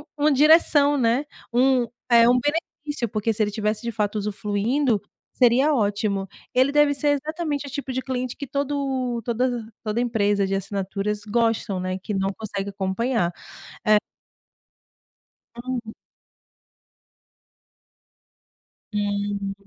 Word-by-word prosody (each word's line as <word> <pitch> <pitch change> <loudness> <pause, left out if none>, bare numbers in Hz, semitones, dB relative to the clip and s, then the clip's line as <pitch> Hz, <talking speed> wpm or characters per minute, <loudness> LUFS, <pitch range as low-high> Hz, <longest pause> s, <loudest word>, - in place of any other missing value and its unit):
uma 300 0 +3
direção, 290 0 +5
né. 250 +1 +2 0.3
Um 250 0 +3 0.2
eh, 235 0 +7
um 250 - +5
benefício, 290 -3 -2
porque 215 +2 0
se 220 - -3
ele 210 - +2
tivesse 210 0 -1
de 235 - -3
fato 210 -1 -1
usufluindo, 210 +4 0 0.3
seria 260 +4 +4
ótimo. 205 -4 0 0.3
Ele 260 +2 +4
deve 295 0 +4
ser 290 +1 0
exatamente 305 -1 -3
o - - -7
tipo 275 -1 -4
de 260 - -1
cliente 255 -1 -3
que 285 - -5
todo 270 -3 -2
todas 245 -1 -1 0.2
toda 215 +1 -1
empresa 205 -4 +1
de 195 - -2
assinaturas 195 +1 -3
gostam, 225 -3 0
né. 185 0 -2
Que 210 - -5
não 195 0 0
consegue 200 -2 -4
acompanhar, 195 0 -1 0.6
eh 215 0 +6 1.7
Uhum. 245 -3 -4 3.0
Hum. 205 -1 -1
235 Hz, 120 wpm, -24 LUFS, 205-270 Hz, 3.0 s, eh